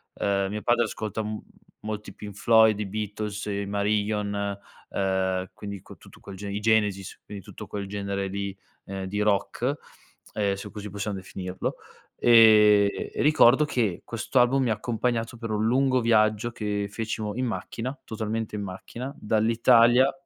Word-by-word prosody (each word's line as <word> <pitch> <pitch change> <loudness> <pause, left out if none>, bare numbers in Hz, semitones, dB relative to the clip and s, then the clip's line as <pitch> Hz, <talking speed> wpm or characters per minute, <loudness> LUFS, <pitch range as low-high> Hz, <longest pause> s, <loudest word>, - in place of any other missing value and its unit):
uhm, 100 -1 0
mio 105 +1 -4
padre 120 +1 +3
ascolta 110 0 -4
m 105 0 -4 0.4
molto 105 -1 -5
i - - -12
Pink 105 -1 -8
Floyd, 110 0 +5
i 105 - -2
Beatles, 105 0 -4
i 100 -1 -2
Marillion, 100 0 -1 0.3
uhm, 95 -1 -1
quindi 100 -2 -7
q - - -13
tutto - - -17
quel 100 - -10
gene 100 +1 -6
i 100 - -2
Genesis, 105 -3 0
quindi 100 -3 -9
tutto - - -10
quel 100 -1 -5
genere 100 -1 -3
di, 100 0 -4 0.3
uhm, 95 0 -5
di 105 +2 -2
rock, 105 +6 0 0.6
ehm, 100 -2 0
se 100 +2 -8
così 105 -1 -7
possiam 100 +1 -4
definirlo, 95 -1 -5 0.4
ehm, 105 -3 +7 0.2
e - - -2
ricordo 150 -2 +5
che 115 -10 -1
questo 115 +3 -1
album 130 +2 +4
mi 125 - 0
ha - - +4
accompagnato 115 +2 -2
per 115 -1 -5
un 105 0 0
lungo 130 +2 +3
viaggio 110 0 +2
che 105 -3 -2
fecimo 110 -1 -3
in 130 - -1
macchina, 125 +2 -4
totalmente 110 0 -4
in 105 - -3
macchina, 115 +8 -7
dall'Italia 115 +4 +4
105 Hz, 165 wpm, -26 LUFS, 100-115 Hz, 0.6 s, ehm